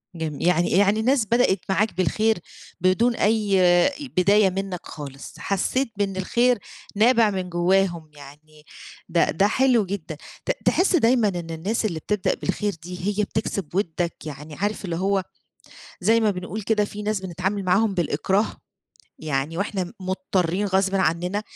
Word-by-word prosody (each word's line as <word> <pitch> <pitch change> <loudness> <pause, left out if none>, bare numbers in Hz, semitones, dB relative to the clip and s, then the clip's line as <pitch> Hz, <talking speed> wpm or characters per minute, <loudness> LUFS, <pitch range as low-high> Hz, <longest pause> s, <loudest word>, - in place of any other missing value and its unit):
جم 160 -3 -4
يعني، 175 0 +2
يعني 200 +3 +3
الناس 250 0 +2
بدأت 230 -3 +2
معاك 210 +3 +1
بالخير، 215 +5 +2 0.4
بدون 220 +7 +3
أي 210 -3 +2
آآ، 175 +7 +5 0.3
بداية 200 +2 +5
منّك 190 -1 -4
خالص، 140 -2 -9
حسّيت 230 +6 -1
بإن 200 -2 -1
الخير 240 +6 +2 0.4
نابع 225 +1 +4
من 185 -2 -3
جوّاهم 175 -2 +1
يعني 150 +1 -15 0.5
ده، 170 0 +2
ده 195 +5 +2
حلو 245 -2 +3
جدًا، 180 -5 -5 0.3
ت - - +1
تحس 365 +1 +3
دايمًا 240 -6 +3
إن 175 -4 -4
الناس 195 +8 -2
اللي 170 -6 -2
بتبدأ 210 +3 0
بالخير 205 -1 -2
دي 180 +2 -6
هي - - +3
بتكسب 200 -5 -3
ودّك، 175 -3 -1
يعني 150 0 -8
عارف 205 +1 -2
اللي 170 - -3
هو 195 +2 0 0.8
زي 225 +5 +3
ما 215 -2 +3
بنقول 185 +3 -5
كده 210 +1 +1
في 205 0 -7
ناس 210 -1 -1
بنتعامل 190 +2 -3
معاهم 195 +3 +2
بالإكراه، 185 +5 0 0.6
يعني 150 +1 -2
وإحنا 200 -1 -1
م 175 - -10
مضطّرين 185 0 -1
غصبٍ 190 0 +1
عنّنا، 180 +2 0
190 Hz, 155 wpm, -23 LUFS, 175-210 Hz, 0.8 s, آآ